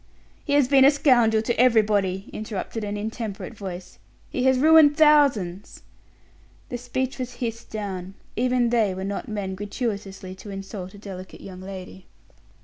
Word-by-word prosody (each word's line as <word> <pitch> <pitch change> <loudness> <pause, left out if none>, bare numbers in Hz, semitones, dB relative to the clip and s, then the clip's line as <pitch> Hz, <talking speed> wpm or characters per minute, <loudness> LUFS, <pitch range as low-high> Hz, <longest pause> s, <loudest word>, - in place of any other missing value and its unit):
"He 285 - -2
has 285 -3 +4
been 270 0 +6
a 270 - +9
scoundrel 240 -7 +3
to 235 0 -1
everybody," 210 -6 +3
interrupted 215 +1 -5
an 205 0 -3
intemperate 220 0 -5
voice; 190 -4 -8 0.3
"he 255 - -1
has 260 -1 +4
ruined 305 +1 +6
thousands." 275 - +3 0.9
The 245 - -4
speech 260 +2 -3
was 250 -1 -5
hissed 230 -2 -5
down; 195 -3 -5 0.2
even 245 0 +1
they 215 -6 +2
were 190 - -5
not 200 +1 -4
men 205 -3 -3
gratuitously 200 -2 -4
to 190 +2 -11
insult 195 -1 -7
a - - -11
delicate 190 -2 -9
young 185 -1 -9
lady. 190 -1 -9
215 Hz, 150 wpm, -24 LUFS, 195-250 Hz, 0.9 s, a